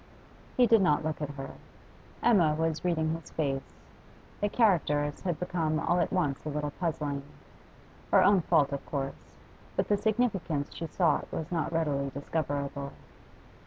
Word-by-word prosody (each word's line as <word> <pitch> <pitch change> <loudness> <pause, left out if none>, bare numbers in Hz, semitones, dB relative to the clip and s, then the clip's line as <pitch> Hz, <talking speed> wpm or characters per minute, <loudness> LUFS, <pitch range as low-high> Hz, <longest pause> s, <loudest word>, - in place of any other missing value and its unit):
He 250 - +7
did 225 -2 +5
not 150 -5 +3
look 155 -1 -2
at 150 - -2
her. 135 -1 -6 0.7
Emma 175 -10 +5
was 160 0 -1
reading 160 -3 +1
his 165 0 -7
face; 135 -4 -2 0.6
the 205 - +1
characters 150 - +2
had 175 -5 -2
become 165 -3 0
all 175 +2 +1
at 170 - +1
once 145 -7 0
a 155 - -4
little 150 0 -2
puzzling; 150 -4 -2 0.9
her - - +6
own 200 -2 +5
fault, 145 -3 +3
of 140 - -3
course, 135 -2 -5 0.4
but - - 0
the 205 - +4
significance 200 -10 0
she 165 - -5
sought 165 -3 +1
was 160 +1 -4
not 165 -1 -1
readily 145 -4 0
discoverable. 140 0 -3
155 Hz, 155 wpm, -29 LUFS, 145-180 Hz, 0.9 s, He